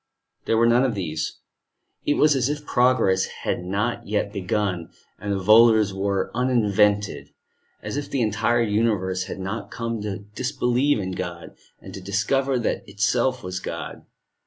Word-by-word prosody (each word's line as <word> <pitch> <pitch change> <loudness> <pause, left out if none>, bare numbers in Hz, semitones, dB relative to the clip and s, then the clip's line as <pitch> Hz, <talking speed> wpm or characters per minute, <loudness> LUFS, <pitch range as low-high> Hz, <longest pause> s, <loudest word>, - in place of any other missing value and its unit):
There 115 - +2
were 115 - +4
none 120 +2 +4
of 125 -4 0
these. 80 -5 -3 0.7
It 145 - +3
was 150 -1 +4
as 130 0 +1
if 150 0 -4
progress 120 -8 +3 0.2
had - - -1
not 100 +6 -2
yet 105 -1 -1
begun, 95 -2 -2 0.3
and 100 0 -2
volors 110 0 +5
were 100 0 -1
uninvented, 105 -5 +1 0.5
as - - -4
if 145 - -4
the 130 -4 0
entire 115 +2 +1
universe 105 -4 0
had 95 - -6
not 95 +1 -5
come 115 -2 -4
to 100 -1 -5
disbelieve 130 +2 +1
in 95 -3 -3
God, 90 -2 -6 0.2
and - - -11
to 95 - -7
discover 125 +8 0
that 120 - -2
itself 120 +5 0
was 90 0 -4
God. - - -7
105 Hz, 155 wpm, -24 LUFS, 95-120 Hz, 0.7 s, volors